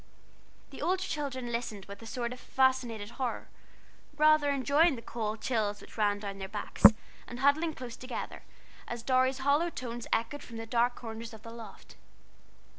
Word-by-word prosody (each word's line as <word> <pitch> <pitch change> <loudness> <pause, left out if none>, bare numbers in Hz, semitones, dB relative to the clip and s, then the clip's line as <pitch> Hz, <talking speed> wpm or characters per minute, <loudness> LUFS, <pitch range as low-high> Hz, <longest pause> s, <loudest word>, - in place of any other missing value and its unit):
The - - -9
older 370 +1 +1
children 270 -7 -3
listened 230 -4 -3
with 200 +1 -10
a 225 - -9
sort 240 0 -3
of 250 - -11
fascinated 245 -6 +1
horror, 250 - -2 0.7
rather 305 -1 +5
enjoying 280 +3 +4
the 230 - -8
cold 220 -2 -3
chills 210 -4 0
which - - -14
ran 205 -2 +2
down 200 -1 -6
their 190 - -4
backs, 210 0 +6 0.4
and 240 - -7
huddling 305 +3 +3
close 250 -2 -7
together, 255 0 -6 0.5
as 235 -1 -5
Dorry's 260 +1 +3
hollow 295 +5 +4
tones 240 -6 -6
echoed 280 +6 0
from 230 - -9
the 225 - -5
dark 240 +2 +2
corners 225 -1 -7
of 220 - -15
the 230 - -8
loft. 230 -3 -11
240 Hz, 170 wpm, -31 LUFS, 225-275 Hz, 0.7 s, backs